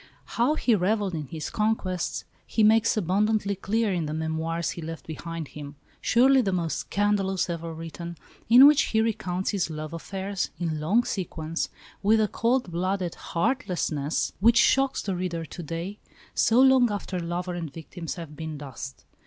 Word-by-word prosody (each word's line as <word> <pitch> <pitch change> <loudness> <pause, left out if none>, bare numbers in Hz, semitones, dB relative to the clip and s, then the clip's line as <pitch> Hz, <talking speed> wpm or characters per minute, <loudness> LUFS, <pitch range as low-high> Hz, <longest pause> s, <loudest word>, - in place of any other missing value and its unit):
How 250 +6 +1
he 245 - +2
revelled 200 0 +1
in 155 -3 -4
his 155 +2 -5
conquests 210 -5 -1 0.2
he 220 - +1
makes 220 +1 +4
abundantly 200 +2 +1
clear 210 +2 0
in 170 -4 -1
the 150 - -3
Memoirs 160 +1 -2
he 170 - -7
left 165 0 -7
behind 165 0 -6
him 145 -1 -9 0.3
surely 265 +3 +5
the 200 -5 0
most 170 -3 -1
scandalous 195 -3 0
ever 165 0 -4
written 165 +1 -7 0.3
in 250 +4 +10
which 290 0 +7 0.2
he - - +5
recounts 210 -5 -1
his 195 -4 -1
love 155 0 -6
affairs, 195 +3 -3
in 160 -3 -2
long 195 +11 +3
sequence, 165 -6 -3 0.3
with 215 +2 +4
a 215 - +3
cold 235 -1 0
blooded 185 +1 -1
heartlessness 170 - -1
which 230 +4 +5
shocks 270 +2 +3
the 195 -2 -2
reader 175 -2 -3
to 175 - -8
day, 170 +5 -5 0.3
so 230 +2 +3
long 260 -2 +6
after 195 -2 -3
lover 175 +1 -3
and 165 -4 -5
victims 165 +2 -7
have 165 -4 -8
been 160 0 -5
dust. 135 -1 -8
180 Hz, 165 wpm, -26 LUFS, 165-215 Hz, 0.3 s, in